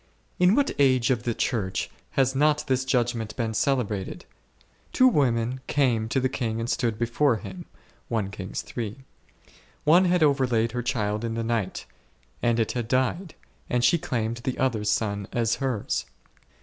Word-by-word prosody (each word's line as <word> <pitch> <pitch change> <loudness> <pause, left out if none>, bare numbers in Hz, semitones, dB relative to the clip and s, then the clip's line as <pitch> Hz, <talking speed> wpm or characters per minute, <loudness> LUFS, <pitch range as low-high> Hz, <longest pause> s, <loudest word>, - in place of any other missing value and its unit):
] - - -40
In 180 +3 +5
what 280 0 +2
age 130 -2 +4
of 120 -3 +1
the 120 -2 0
Church 95 -7 -1 0.3
has 135 -1 +3
not 150 +2 +2
this 130 -1 0
judg 120 -2 +1
ment 110 -2 -5
been 115 -3 -2
celebrated? 110 -7 -1 0.7
Two 255 - +5
women 125 - +1
came 120 -6 +1
to 135 - +1
the 130 - +2
king 115 -4 -2
and 115 - -2
stood 115 -3 0
before 120 +3 +2
him 170 - -8 0.4
a. 100 +1 -4 0.9
One 170 +5 +5
had 180 -2 +3
overlaid 125 -6 +2
her 125 +1 -2
child 105 -2 -1
in 115 -1 -2
the 115 - -2
night, 115 -4 -2 0.6
and 120 -1 +2
it 110 - +1
had 120 -3 -3
died, 130 +8 0 0.3
and 125 -1 +1
she 170 +7 +4
claimed 115 -4 -2
the 125 +1 -3
other's 115 -5 0
son 100 -2 -1
as 115 -2 0
hers. 125 -6 -1
120 Hz, 160 wpm, -26 LUFS, 110-135 Hz, 0.9 s, In